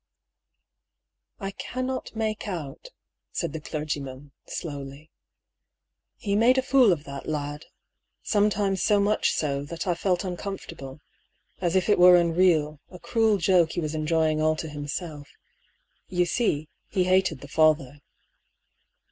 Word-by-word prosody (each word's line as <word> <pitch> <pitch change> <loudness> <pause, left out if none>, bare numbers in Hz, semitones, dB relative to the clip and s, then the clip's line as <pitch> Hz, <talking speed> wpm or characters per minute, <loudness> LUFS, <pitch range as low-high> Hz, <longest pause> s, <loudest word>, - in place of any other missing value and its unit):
" - - -57
I 195 -2 -4
cannot 255 +5 -4
make 220 -1 -2
out," 160 -8 -6 0.4
said - - -3
the 160 - -5
clergyman, 145 -3 -5 0.2
slowly. 145 0 -7 0.5
" - - -59
He 200 -1 +1
made 240 +5 +4
a 260 - +2
fool 260 -5 +5
of 160 -4 -1
that 140 -2 -8
lad; 145 0 -4 0.6
sometimes 205 -2 +1
so 205 -1 +3
much 205 +1 +2
so 140 -2 -1
that 165 +2 -5
I 180 - +2
felt 180 +2 0
uncomfortable, 180 -7 -6 0.6
as 175 -1 0
if 185 - +2
it 210 - +3
were 180 0 +9
unreal, 165 -3 +2
a 180 - -11
cruel 220 +3 +2
joke 175 -2 +3
he - - -2
was 155 -2 -3
enjoying 155 0 +1
all 155 0 +3
to 160 0 -5
himself. 145 +1 -6 0.8
You 180 -1 +1
see, 165 -6 0 0.2
he 190 -3 +1
hated 185 -5 +2
the 145 - -9
father." 150 -2 +2
170 Hz, 140 wpm, -26 LUFS, 150-195 Hz, 0.8 s, were